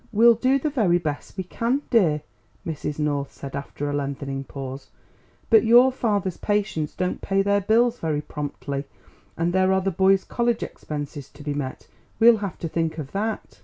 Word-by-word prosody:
"We'll 235 +2 +7
do 255 +4 +2
the 295 +2 -2
very 205 -11 +3
best 155 +1 -5
we 190 - -2
can, 235 +9 -1
dear," 160 - +3 0.4
Mrs. 150 -3 -4
North 145 -2 -1
said 140 -1 -8
after 140 +1 -4
a 145 - -2
lengthening 140 -1 -3
pause; 135 0 -7 0.6
"but 225 - +7
your 240 +3 +7
father's 205 -8 -1
patients 205 -7 -1
don't 180 0 -2
pay 195 0 +1
their 200 0 +2
bills 235 +4 +3
very 155 -2 -1
promptly, 145 -2 -5 0.5
and 170 +1 0
there 190 0 +3
are 190 0 +3
the 195 +1 0
boys' 190 +2 +3
college 235 -1 0
expenses 145 -2 -6
to 145 +1 -13
be 145 0 -2
met; 140 -2 -5 0.3
we'll 230 0 +7
have 200 -4 -5
to 165 - -2
think 165 0 -1
of 145 -3 -6
that." 205 - -3
180 Hz, 180 wpm, -24 LUFS, 145-220 Hz, 0.6 s, We'll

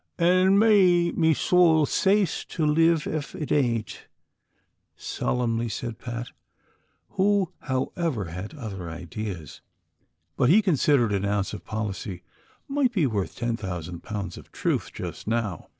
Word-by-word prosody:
" - - -48
An' 185 +3 +4
may 185 -5 +5
me 160 -2 +2
sowl 165 -3 +4
sace 195 +1 +1
to 160 - -2
liv 165 +1 +3
ef 150 -3 -4
it 150 - -5
aint," 120 -6 0 0.9
solemnly 115 -1 -1
said 115 +1 -5
Pat, 120 0 -5 0.8
who 195 -2 +1
however 130 - -2
had 90 - -7
other 100 - -6
ideas, 85 0 -7 0.7
but 125 - +2
he 210 +7 +6
considered 140 - +3
au 100 0 0
ounce 100 -1 -1
of 105 - -7
policy 100 -4 -4 0.4
might 275 -3 +1
be 185 -10 +1
worth 105 -7 -2
ten 120 -1 -1
thousand 90 -5 -6
pounds 105 -3 -5
of - - -17
truth, - - -1
just - - -7
now. 110 -6 -2
125 Hz, 135 wpm, -25 LUFS, 105-170 Hz, 0.9 s, he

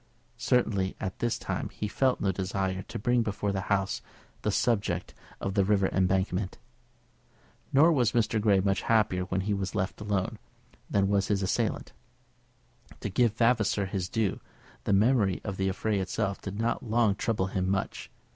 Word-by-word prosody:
Certainly 105 -6 +2
just - - -34
at 95 - -4
this 120 -1 0
time - - -3
he 105 - -4
felt 130 +4 +1
no 95 - +1
desire 95 0 -2
to - - -7
bring 120 +3 +2
before 105 -2 -1
the 95 -1 -4
House 95 -1 +1 0.4
the - - 0
subject 100 -7 0 0.3
of 95 - -2
the 100 -1 +3
River 100 -1 +2
Embankment. 95 0 0 1.1
Nor 155 +5 +6
was 125 -7 +2
Mr. 110 -2 +1
Grey 100 -3 +4
much 95 0 +1
happier 105 -5 +2
when 95 +1 -1
he 105 +2 -1
was 100 0 -3
left 95 0 -2
alone, 100 -3 -1 0.5
than 100 -1 +2
was 100 -1 +2
his 100 -2 +1
assailant. 110 +4 -1 1.1
To - - -2
give 115 +1 +2
Vavasor 115 -4 +2
his 95 -2 -3
due, 110 -5 0 0.5
the - - +2
memory 105 -2 +3
of 100 -3 -4
the 95 0 +1
affray 105 +2 -1
itself 95 +1 -2
did 100 +1 -6
not 115 +1 0
long 115 -2 +2
trouble 105 -1 -1
him 95 0 0
much. 95 0 -2
100 Hz, 170 wpm, -28 LUFS, 95-110 Hz, 1.1 s, Nor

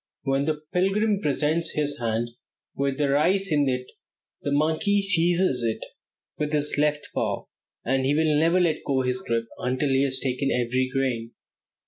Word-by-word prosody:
When 135 0 +1
the 155 -1 -2
pilgrim 195 +3 +2
presents 150 +1 0
his 145 -1 -1
hand 115 0 -1 0.5
with 140 -1 -1
the 145 - +1
rice 180 +7 +2
in 145 -2 +3
it, 125 0 -2 0.6
the 140 - -2
monkey 160 +8 +2
seizes 175 -6 +2
it 115 -2 -2 0.5
with 150 0 -2
his 150 0 +1
left 150 0 0
paw, - - -2 0.4
and 135 +2 +1
he 140 +2 +2
will 155 -1 +2
never 165 +4 +3
let 170 -3 +1
go 135 -2 +1
his 125 0 -1
grip 115 0 -1
until 130 +3 0
he 135 0 +3
has 135 -1 +1
taken 135 +1 -1
every 130 +1 0
grain. 125 -4 -1
145 Hz, 165 wpm, -25 LUFS, 130-160 Hz, 0.6 s, in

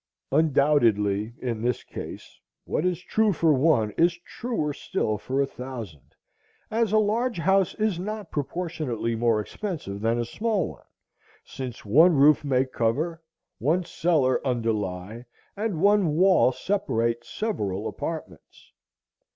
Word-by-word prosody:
Undoubtedly, 120 -8 +2
in 115 -4 -3
this 120 +1 -1
case, - - -9 0.3
what - - -1
is 180 0 -2
true 220 +2 +2
for 165 -3 +3
one 130 -6 +3
is 170 0 +4
truer 225 -12 -3
still 110 - -2
for 130 +6 -2
a 140 - +3
thousand, 120 - -9 0.6
as 225 -1 +1
a 215 - +4
large 225 +3 +1
house 190 +2 +2
is 215 -5 0
not 210 0 -5
proportionally 145 -6 -3
more 115 -1 +2
expensive 105 - -5
than 115 +1 +1
a 120 - -1
small 210 - -1
one, - - -14 0.6
since 125 -4 -7
one 160 - +6
roof 150 +2 +5
may 135 -2 +2
cover, 140 +8 -1 0.4
one 165 +8 +1
cellar 155 -8 +1
underlie, 110 -4 -2 0.3
and 205 -5 -2
one 200 -4 +3
wall 185 -6 +5
separate 120 - -1
several 105 - -3
apartments. 160 -2 -7
145 Hz, 130 wpm, -25 LUFS, 115-180 Hz, 0.6 s, one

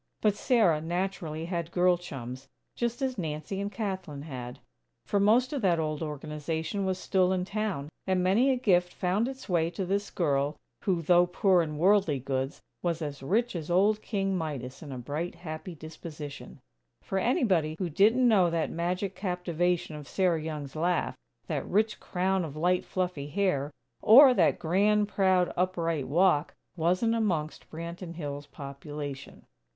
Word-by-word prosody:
But 210 -2 +3
Sarah 205 -11 +3
naturally 170 -2 -3
had 170 -2 -3
girl 180 +1 +3
chums, 135 -6 -8 0.3
just 240 +3 -2
as 260 -4 -1
Nancy 155 +4 -3
and 200 0 -3
Kathlyn 190 -10 -4
had; 125 -5 -7 0.5
for 200 - +1
most 235 +7 +4
of 280 - -2
that 180 -4 +3
old 155 -1 -2
Organization 160 +4 -3
was 185 -1 0
still 185 -1 +2
in 185 -1 0
town; 195 -8 -2 0.2
and 185 -1 +2
many 210 +9 +4
a 265 - +3
gift 180 -8 +2
found 190 +6 +1
its 265 0 -7
way 170 -4 +2
to 190 +2 -4
this 200 +2 -1
girl 145 -3 0 0.3
who, 180 -4 +1
though 175 +2 +5
poor 180 0 +3
in 150 -2 -3
worldly 185 -3 +3
goods, 135 +1 -3 0.2
was 170 -2 -1
as 145 -2 -5
rich 220 - 0
as 160 -2 -5
old 205 +5 +3
King 195 -3 -1
Midas 140 -7 -4
in 150 -4 -8
a 130 - -5
bright, 145 +8 -4
happy 165 0 -7
disposition; 150 -3 -9 0.4
for 190 - -1
anybody 185 - +2
who 185 - -1
didn't 215 - +4
know 195 -6 +5
that 165 -1 -1
magic 180 +3 -2
captivation 180 -3 -1
of 150 -2 -9
Sarah 180 -4 +1
Young's 150 -3 -5
laugh, 175 +3 0 0.3
that - - -3
rich 215 0 +1
crown 185 +1 0
of 150 -3 -6
light, 180 +3 +1
fluffy 180 -6 -2
hair, 150 -5 0 0.3
or 255 +4 +9
that - - +3
grand, 205 +5 +2
proud, 185 -3 +2
upright 170 -5 0
walk, 170 0 +2 0.2
wasn't 185 +7 +2
amongst 175 -9 -1
Branton 170 +2 -7
Hills' 145 -3 -5
population. 140 0 -8
175 Hz, 160 wpm, -29 LUFS, 155-195 Hz, 0.5 s, or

